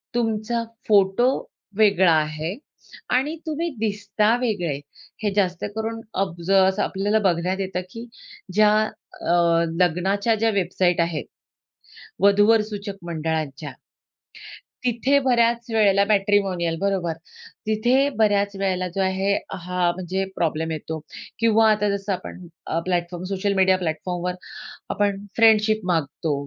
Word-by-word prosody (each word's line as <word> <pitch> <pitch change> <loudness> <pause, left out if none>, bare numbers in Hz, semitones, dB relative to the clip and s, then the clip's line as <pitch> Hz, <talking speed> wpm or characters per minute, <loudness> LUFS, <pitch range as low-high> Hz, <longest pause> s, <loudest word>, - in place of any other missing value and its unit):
तुमचा 230 0 -1 0.2
फोटो 205 +4 +4 0.5
वेगळा 195 -5 +5
आहे 155 +3 -1 0.5
आणि 275 +6 +1
तुम्ही 320 +2 -2
दिसता 210 +1 +1
वेगळे. 175 - -1 0.4
हे 205 - +1
जास्त 185 -3 0
करून 225 +1 -3 0.2
अब 170 -3 -7
जरासं 190 0 +3
आपल्याला 205 +3 0
बघण्यात 180 +2 -1
येतं 185 -1 -2
की 230 +3 -8 0.5
ज्या 210 0 +5 0.5
अ, - - -1 0.5
लग्नाच्या 195 +6 +1
ज्या 225 +1 +1
वेबसाईट 180 -2 +1
आहेत 165 -3 -2 1.0
वधू-वर 205 +3 +5
सूचक 205 -1 -6
मंडळाच्या, 155 -3 -3 1.1
तिथे 255 +4 +2
बऱ्याच 235 -2 +2
वेळेला 200 -3 +4
मॅट्रिमोनियल 195 -5 +1
बरोबर, 190 -4 0 0.5
तिथे 245 +6 +2
बऱ्याच 205 -2 +2
वेळेला 190 -2 -1
जो 195 - 0
आहे 190 +1 +1 0.2
हा 180 -1 -1
म्हणजे 185 +1 -2
प्रॉब्लेम 160 0 -1
येतो. 160 0 -5 0.4
किंवा 225 -1 +4
आता 210 -1 +1
जसं 200 0 -4
आपण 180 0 -7 0.4
प्लॅटफॉर्म 175 -1 -2
सोशल 200 +1 -1
मीडिया 190 -1 +4
प्लॅटफॉर्मवर 180 +1 -3 0.6
आपण 200 -1 -1
फ्रेंडशिप 220 -1 +4
मागतो 155 -1 -1
195 Hz, 115 wpm, -23 LUFS, 180-215 Hz, 1.1 s, वेगळा